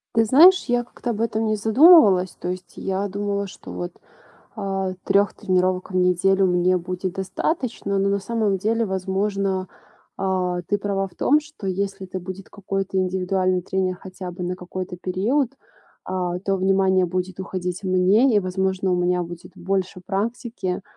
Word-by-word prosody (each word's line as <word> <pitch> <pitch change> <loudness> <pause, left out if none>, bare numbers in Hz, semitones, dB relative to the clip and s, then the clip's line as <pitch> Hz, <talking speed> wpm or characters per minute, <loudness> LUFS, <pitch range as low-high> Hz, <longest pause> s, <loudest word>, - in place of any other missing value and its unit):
Ты 225 0 +4
знаешь, 335 - +7
я 245 0 +1
как-то 240 0 -7
об 225 -2 -2
этом 225 -1 0
не 215 - +1
задумывалась. 215 - +6
То - - -5
есть 185 0 -6
я 195 +1 -2
думала, 200 0 -2
что - - -11
вот, 175 0 -5 0.6
а, 195 -2 -2
3 200 0 +2
тренировок 185 -2 0
в - - -5
неделю 185 +1 +3
мне 180 +1 +2
будет 180 +1 -4
достаточно, 200 - -2
но 195 - +2
на 200 - +2
самом 210 -1 0
деле, 225 +4 0
возможно, 190 0 -1 0.5
а, 185 -2 -1
ты 205 +3 -1
права 195 -1 -1
в 180 - -20
том, 295 +10 +3
что 290 -9 -9
если 195 0 -3
это 185 +1 -5
будет 185 +1 -8
какой-то 195 -1 -3
индивидуальный 185 0 0
тренер 185 0 -1
хотя 185 -1 -8
бы 180 - -9
на 180 +1 -2
какой-то 180 0 -6
период, 215 +10 0 0.5
а, 180 -1 -2
то 195 +1 -1
внимание 190 -1 +3
будет 185 +1 -3
уходить 180 0 -4
мне, 195 +7 +3
и, - - +6
возможно, 190 0 -1
у - - +2
меня 180 0 +1
будет 175 0 -8
больше 190 0 -2
практики, 205 -1 -3
190 Hz, 165 wpm, -23 LUFS, 185-205 Hz, 0.6 s, знаешь